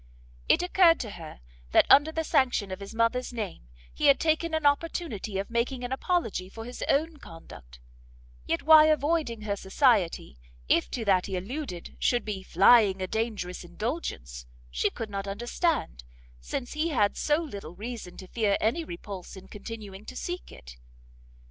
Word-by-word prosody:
It - - +4
occurred 360 -2 +5
to 220 - -6
her 160 - -10 0.3
that - - +6
under 290 +3 +6
the 320 0 -2
sanction 260 - +1
of 185 - -5
his 200 +3 -9
mother's 230 +3 +1
name, 205 - -6 0.2
he - - +1
had 280 - +6
taken 320 +1 +1
an 315 -2 -2
opportunity 285 - 0
of 195 +3 -4
making 245 +2 -1
an 245 - -4
apology 265 - -1
for 225 +3 -9
his 245 +1 -6
own 310 +3 +1
conduct; 65 - -13 0.7
yet 165 - -1
why 315 0 +8
avoiding 305 -6 +1
her 210 -1 -2
society, 195 - +1 0.3
if 170 - +2
to 235 -3 -4
that 190 -3 +3
he 190 - -3
alluded, 195 - -6
should 240 -2 +1
be 205 -3 -4
flying 195 +2 +5
a 185 - -1
dangerous 205 -4 -3
indulgence, 170 - -5 0.2
she - - +1
could 220 -2 -7
not 200 0 -4
understand, 240 - -1 0.4
since 245 - -5
he 305 +2 0
had 210 -9 +2
so 300 +1 +1
little 200 - -7
reason 210 -3 -7
to 185 - -10
fear 205 -1 +1
any 235 +10 0
repulse 190 - -8
in 190 0 -12
continuing 205 -1 -9
to 255 - -9
seek 355 +6 -5
it. - - -13
225 Hz, 165 wpm, -28 LUFS, 190-285 Hz, 0.7 s, why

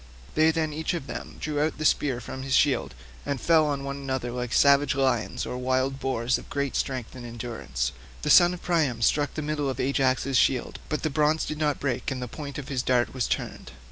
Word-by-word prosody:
They 155 +1 +4
then 160 -1 0
each 160 +3 -2
of 165 - -4
them 120 -3 -7
drew 150 -1 -1
out 155 +1 0
the 155 - -3
spear 135 -4 +2
from 130 +1 -7
his 135 0 0
shield, 130 - +2 0.3
and 140 -2 -2
fell 160 0 +4
on 140 -2 -2
one 140 0 -4
another 130 -3 -3
like 125 -1 -4
savage 140 0 +4
lions 130 -5 0
or 125 - -4
wild 130 +1 0
boars 125 -2 0
of - - -14
great 140 -1 -2
strength 130 -4 -2
and 130 -2 -9
endurance: 115 - -4 0.3
the 150 - +2
son 175 0 +7
of 175 - -13
Priam 150 -10 +1
struck 145 +4 +2
the 155 - -3
middle 150 -2 -1
of 130 - -4
Ajax's 135 0 +1
shield, 125 -3 +1
but 150 - -2
the 155 - 0
bronze 150 +2 +2
did 155 - -5
not 150 -2 +1
break, 130 -3 -1
and 130 -2 -3
the 125 - -4
point 140 +3 -7
of 140 -3 -6
his 135 -4 -1
dart 125 -1 +1
was 130 -4 -1
turned. - - -4
135 Hz, 225 wpm, -26 LUFS, 125-150 Hz, 0.3 s, son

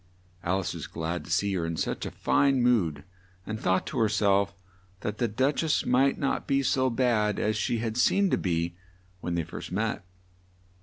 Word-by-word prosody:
Al 95 +2 +1
ice 90 - -3
was - - -6
glad 80 0 -4
to - - -12
see 100 +4 +1
her 90 -3 -1
in 80 0 -3
such - - -2
a - - -3
fine 135 -3 +2
mood, 95 -12 +2 0.4
and 110 0 -4
thought 95 -2 +1
to 130 - -3
her 110 -2 +3
self 100 -2 +2 0.5
that 105 0 -4
the 120 - +2
Duch 130 +7 +1
ess 160 - +1
might 135 +2 +3
not 140 - -1
be 140 -1 +2
so 130 0 +2
bad 115 -4 +1
as 110 +1 0
she 115 +3 0
had 115 0 -3
seemed 195 +9 +3
to - - +3
be 85 -1 -1 0.4
when 90 -1 -3
they 85 - 0
first 85 - -8
met. 105 +1 -1
105 Hz, 200 wpm, -28 LUFS, 90-125 Hz, 0.5 s, her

